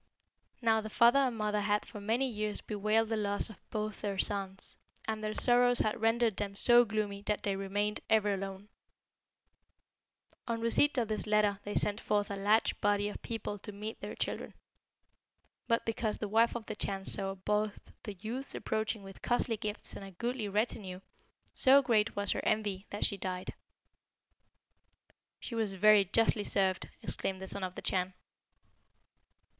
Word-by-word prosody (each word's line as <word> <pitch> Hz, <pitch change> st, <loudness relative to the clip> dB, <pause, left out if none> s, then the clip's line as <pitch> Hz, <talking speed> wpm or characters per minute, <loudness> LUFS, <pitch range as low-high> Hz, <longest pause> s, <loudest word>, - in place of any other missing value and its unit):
"Now 220 Hz, -1 st, +3 dB
the 215 Hz, -, -6 dB
father 235 Hz, +5 st, +5 dB
and 255 Hz, -4 st, +1 dB
mother 210 Hz, -1 st, 0 dB
had 205 Hz, +1 st, 0 dB
for 210 Hz, -, -9 dB
many 230 Hz, +6 st, +1 dB
years 215 Hz, -3 st, -2 dB
bewailed 215 Hz, +1 st, 0 dB
the 225 Hz, -, 0 dB
loss 205 Hz, 0 st, +3 dB
of 215 Hz, -, -15 dB
both 215 Hz, -1 st, -4 dB
their 200 Hz, -1 st, -2 dB
sons, 195 Hz, -1 st, -2 dB, 0.3 s
and 220 Hz, -1 st, -3 dB
their 215 Hz, 0 st, -2 dB
sorrows 245 Hz, 0 st, +4 dB
had 215 Hz, +1 st, -1 dB
rendered 225 Hz, -2 st, +2 dB
them 200 Hz, -1 st, -2 dB
so 240 Hz, +3 st, +6 dB
gloomy 210 Hz, -2 st, -2 dB
that 210 Hz, -, -1 dB
they 200 Hz, -1 st, 0 dB
remained 205 Hz, +2 st, -1 dB
ever 210 Hz, -2 st, +3 dB
alone. 195 Hz, +1 st, -6 dB, 1.8 s
"On 230 Hz, -1 st, -1 dB
receipt 230 Hz, +5 st, +3 dB
of 235 Hz, -3 st, +1 dB
this 215 Hz, 0 st, -2 dB
letter 210 Hz, -1 st, +2 dB
they 205 Hz, -, -4 dB
sent 205 Hz, 0 st, 0 dB
forth 205 Hz, -1 st, 0 dB
a -, -, -2 dB
large 205 Hz, +3 st, +2 dB
body 205 Hz, 0 st, +2 dB
of -, -, -8 dB
people 215 Hz, -2 st, -4 dB
to 210 Hz, -, -7 dB
meet 210 Hz, +2 st, -6 dB
their -, -, -6 dB
children. -, -, -4 dB, 1.1 s
But 230 Hz, -1 st, +1 dB
because 225 Hz, -1 st, -1 dB
the 210 Hz, -, -3 dB
wife 225 Hz, +4 st, +3 dB
of 235 Hz, -2 st, -5 dB
the 215 Hz, -, -5 dB
Chan 195 Hz, -2 st, -3 dB
saw 195 Hz, 0 st, +1 dB
both 210 Hz, +2 st, -1 dB, 0.2 s
the 210 Hz, -, -6 dB
youths 235 Hz, +8 st, -4 dB
approaching 220 Hz, -1 st, -2 dB
with 195 Hz, 0 st, -12 dB
costly 240 Hz, -1 st, +1 dB
gifts 210 Hz, 0 st, -4 dB
and -, -, -8 dB
a 195 Hz, -, -8 dB
goodly 235 Hz, +3 st, -3 dB
retinue, 200 Hz, -3 st, -2 dB, 0.5 s
so 275 Hz, +1 st, +6 dB
great 220 Hz, -4 st, +2 dB
was 200 Hz, -1 st, +1 dB
her -, -, -1 dB
envy 205 Hz, -3 st, -1 dB
that 205 Hz, -, -1 dB
she 200 Hz, -, -1 dB
died." 185 Hz, -1 st, -4 dB, 1.9 s
"She -, -, -7 dB
was 220 Hz, -4 st, -1 dB
very 210 Hz, +1 st, +6 dB
justly 220 Hz, +2 st, +3 dB
served!" 190 Hz, -2 st, +1 dB
exclaimed 190 Hz, -1 st, -2 dB
the 190 Hz, -, -6 dB
Son 195 Hz, 0 st, -3 dB
of 185 Hz, 0 st, -4 dB
the -, -, -7 dB
Chan. 185 Hz, 0 st, -1 dB
210 Hz, 170 wpm, -32 LUFS, 200-225 Hz, 1.9 s, so